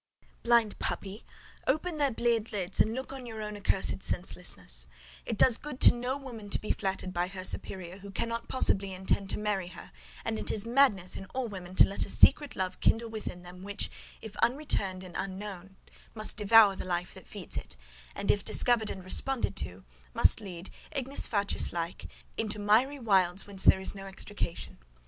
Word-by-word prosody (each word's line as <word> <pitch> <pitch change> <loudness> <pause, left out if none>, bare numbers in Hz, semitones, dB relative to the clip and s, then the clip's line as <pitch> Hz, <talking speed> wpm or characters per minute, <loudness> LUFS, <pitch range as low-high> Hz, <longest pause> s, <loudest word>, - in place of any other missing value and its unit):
Blind 235 -3 +3
puppy! 200 +2 -4 0.4
Open 310 +4 0
their 285 -1 +3
bleared 230 -2 0
lids 195 -2 -1
and 220 +1 +3
look 265 +1 -5
on 260 -2 -8
your 220 -1 -7
own 210 0 -5
accursed 195 -1 0
senselessness! 65 - -3 0.4
It - - -2
does 245 -3 +6
good 295 -3 -8
to - - +9
no 245 +3 -2
woman 235 -7 -9
to - - +2
be 215 - -2
flattered 190 -2 -2
by 175 0 0
her 185 0 -7
superior, 185 -1 -3
who 200 +1 -10
cannot 230 +4 -3
possibly 195 -6 +2
intend 190 +1 -1
to - - 0
marry 210 -4 -1
her; 180 - -11 0.3
and 110 - -2
it 105 - -1
is 215 -1 -1
madness 230 -7 +3
in - - -7
all 260 -2 -1
women 185 -3 -8
to - - +7
let 200 - -2
a - - -6
secret 290 -2 +5
love 185 -1 -2
kindle 230 0 +2
within 210 -5 -6
them, 180 +1 -11
which, 200 +1 -4 0.3
if 220 -2 -8
unreturned 205 -9 0
and 180 -2 -11
unknown, 195 -1 -5 0.4
must 215 -1 0
devour 210 -1 +6
the - - -5
life 175 -1 -2
that - - -12
feeds - - -4
it; - - -6 0.4
and, 200 - +1
if 205 - -1
discovered 235 -3 +3
and 190 - -6
responded 255 +7 0
to, 90 +2 -3 0.3
must - - +5
lead, 185 -3 -8 0.2
ignis 275 +1 -1
fatuus 205 -2 0
like, 170 0 -4 0.3
into 215 -1 0
miry 220 +8 +3
wilds 195 -6 +2
whence 195 -2 0
there - - +7
is 190 - 0
no 195 -1 -8
extrication. 195 - -5
200 Hz, 185 wpm, -30 LUFS, 185-230 Hz, 0.4 s, to